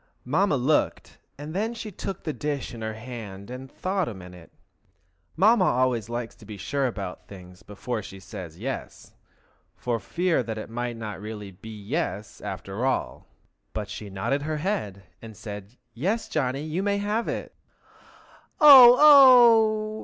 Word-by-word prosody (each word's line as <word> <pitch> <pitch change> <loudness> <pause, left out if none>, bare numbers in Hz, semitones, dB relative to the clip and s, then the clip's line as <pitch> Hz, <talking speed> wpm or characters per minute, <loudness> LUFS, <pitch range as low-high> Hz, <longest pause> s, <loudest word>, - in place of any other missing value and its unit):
Mamma 150 +4 +1
looked, 135 +5 -1 0.2
and 150 +2 -8
then 220 +5 -2
she 220 -2 -7
took 190 0 -6
the 155 - -3
dish 145 -4 -4
in 115 - -9
her 110 0 -4
hand 110 -3 -9
and 130 +1 -9
thought 190 -1 -2
a 115 - -6
minute. 90 -2 -13 0.8
Mamma 205 +2 +4
always 120 - +1
likes 120 -1 -4
to - - -17
be 105 -1 -9
sure 135 +8 -1
about 100 -6 -7
things 90 -1 -13
before 110 +3 -5
she 95 -1 -11
says 90 -4 -9
"Yes!" 130 +7 -7 0.6
for 120 -2 -2
fear 175 - 0
it 110 -3 -5
might 120 0 -4
not 105 -3 -7
really 105 -2 -7
be 95 +4 -13
"yes" 105 - -4
after 100 +5 -5
all. 130 0 -2 0.5
But 105 -1 -4
now - - -8
she 105 - -7
nodded 100 +9 -2
her 155 +1 -3
head, 150 - -3 0.2
and 110 -2 -11
said, 105 +1 -9 0.2
"Yes, 195 - -2
Johnny, 135 -1 -2
you 155 +4 -3
may 200 0 0
have 210 +3 -2
it." - - -5 1.1
"O 260 -5 +10
oh!" 235 -7 +6
125 Hz, 160 wpm, -25 LUFS, -, 1.1 s, O